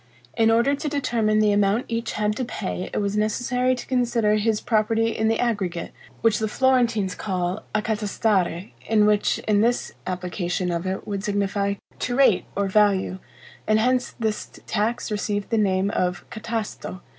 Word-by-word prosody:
In 225 Hz, 0 st, +4 dB
order 235 Hz, +5 st, +3 dB
to 290 Hz, +1 st, -2 dB
determine 235 Hz, -7 st, +1 dB
the 215 Hz, -1 st, +4 dB
amount 205 Hz, +3 st, +2 dB
each 230 Hz, 0 st, -3 dB
had 210 Hz, 0 st, 0 dB
to 260 Hz, -, -1 dB
pay, 90 Hz, -, -4 dB
it -, -, -3 dB
was 200 Hz, 0 st, -1 dB
necessary 245 Hz, +4 st, +1 dB
to 245 Hz, -, -7 dB
consider 240 Hz, -4 st, +1 dB
his 215 Hz, 0 st, +1 dB
property 225 Hz, 0 st, +1 dB
in 220 Hz, -, +1 dB
the 225 Hz, 0 st, +1 dB
aggregate, 195 Hz, -8 st, -1 dB, 0.3 s
which 225 Hz, -2 st, +3 dB
the 220 Hz, -, 0 dB
Florentines 235 Hz, -5 st, +2 dB
call 185 Hz, 0 st, -2 dB
accatastare, 210 Hz, -4 st, 0 dB, 0.2 s
in 215 Hz, -1 st, +4 dB
which 210 Hz, -1 st, +2 dB
in 210 Hz, -1 st, +3 dB
this 240 Hz, +2 st, +1 dB, 0.2 s
application 180 Hz, 0 st, -2 dB
of 170 Hz, +2 st, -2 dB
it 190 Hz, +1 st, -3 dB
would 200 Hz, -1 st, -3 dB
signify 200 Hz, 0 st, 0 dB, 0.2 s
TO 245 Hz, -, -1 dB
RATE 265 Hz, -8 st, +4 dB
or 200 Hz, 0 st, +1 dB
VALUE, 195 Hz, -2 st, +2 dB, 0.5 s
and 215 Hz, 0 st, +4 dB
hence 250 Hz, +2 st, +1 dB
this 220 Hz, -2 st, -2 dB, 0.2 s
tax 225 Hz, +2 st, -1 dB
received 205 Hz, 0 st, -2 dB
the 225 Hz, -, +2 dB
name 195 Hz, -1 st, +1 dB
of 180 Hz, +1 st, -1 dB
catasto. 220 Hz, -4 st, -5 dB
215 Hz, 165 wpm, -24 LUFS, 200-230 Hz, 0.5 s, In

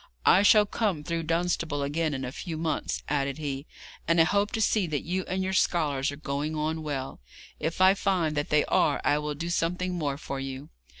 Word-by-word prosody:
'I 190 Hz, -, +6 dB
shall 210 Hz, 0 st, +6 dB
come 200 Hz, -7 st, -1 dB
through 165 Hz, +2 st, -2 dB
Dunstable 165 Hz, -3 st, 0 dB
again 150 Hz, +1 st, -1 dB
in 130 Hz, 0 st, -4 dB
a 125 Hz, -, -5 dB
few 165 Hz, +2 st, -6 dB
months,' 160 Hz, 0 st, -2 dB
added 140 Hz, -1 st, -1 dB
he, 140 Hz, -2 st, -4 dB, 0.4 s
'and 165 Hz, 0 st, +3 dB
I -, -, +8 dB
hope 200 Hz, +5 st, +1 dB
to 225 Hz, -, -1 dB
see 210 Hz, -3 st, +2 dB
that 150 Hz, -3 st, -2 dB
you 185 Hz, +2 st, -2 dB
and 190 Hz, +1 st, -1 dB
your 190 Hz, 0 st, -2 dB
scholars 150 Hz, -7 st, +1 dB
are -, -, -6 dB
going 150 Hz, +1 st, -3 dB
on 155 Hz, +1 st, -1 dB
well. 140 Hz, -3 st, -4 dB, 0.4 s
If 160 Hz, +4 st, -2 dB
I 190 Hz, +1 st, +7 dB
find 185 Hz, -6 st, 0 dB
that 145 Hz, 0 st, -1 dB
they 150 Hz, 0 st, +3 dB
are 145 Hz, -, +2 dB
I 145 Hz, -, +2 dB
will 150 Hz, 0 st, -3 dB
do 170 Hz, +4 st, -4 dB
something 180 Hz, +2 st, -1 dB
more 145 Hz, -5 st, -2 dB
for 140 Hz, -1 st, -5 dB
you.' 135 Hz, +2 st, -6 dB
155 Hz, 215 wpm, -27 LUFS, 145-180 Hz, 0.4 s, I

